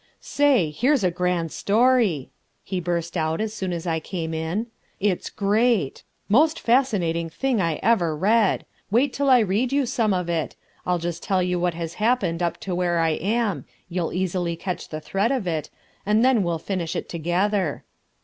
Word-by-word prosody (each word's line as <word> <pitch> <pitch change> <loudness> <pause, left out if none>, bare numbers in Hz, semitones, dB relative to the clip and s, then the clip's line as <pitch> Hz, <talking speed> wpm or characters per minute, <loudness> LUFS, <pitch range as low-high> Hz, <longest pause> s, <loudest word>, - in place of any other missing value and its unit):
"Say, 270 - +2
here's 250 - +2
a 180 - +2
grand 180 -2 -1
story," 220 - +2 0.3
he 190 -1 -3
burst 170 -1 -2
out 160 -1 0
as 215 0 -2
soon 190 -4 -3
as 170 -1 -4
I 165 -2 0
came 165 -1 -4
in; 160 +7 -2 0.3
"it's 195 -2 0
great! 210 - +1 0.3
most 305 +9 +3
fascinating 195 -10 +1
thing 245 +6 0
I 165 -3 0
ever 175 -9 +2
read. 210 +4 +2 0.2
Wait 255 +6 +2
till 280 0 0
I 255 - +7
read 215 +5 0
you 280 -1 +2
some 230 -3 0
of 180 -2 0
it. 165 -2 -2 0.3
I'll 180 0 +2
just 170 0 -4
tell 190 -2 +1
you 180 0 0
what 175 -1 0
has 165 -1 -4
happened 210 -8 +1
up 170 -1 0
to 190 - -4
where 175 -1 0
I 165 -1 +2
am 200 - -1 0.2
you'll 175 -2 -2
easily 180 -2 -1
catch 180 +2 -5
the 155 0 -5
thread 200 - 0
of 255 -7 -1
it 160 -4 -2 0.3
and 215 +4 +3
then 260 -4 +4
we'll 170 -3 0
finish 175 0 -3
it - - -3
together." 175 +1 -1
185 Hz, 180 wpm, -24 LUFS, 170-225 Hz, 0.3 s, I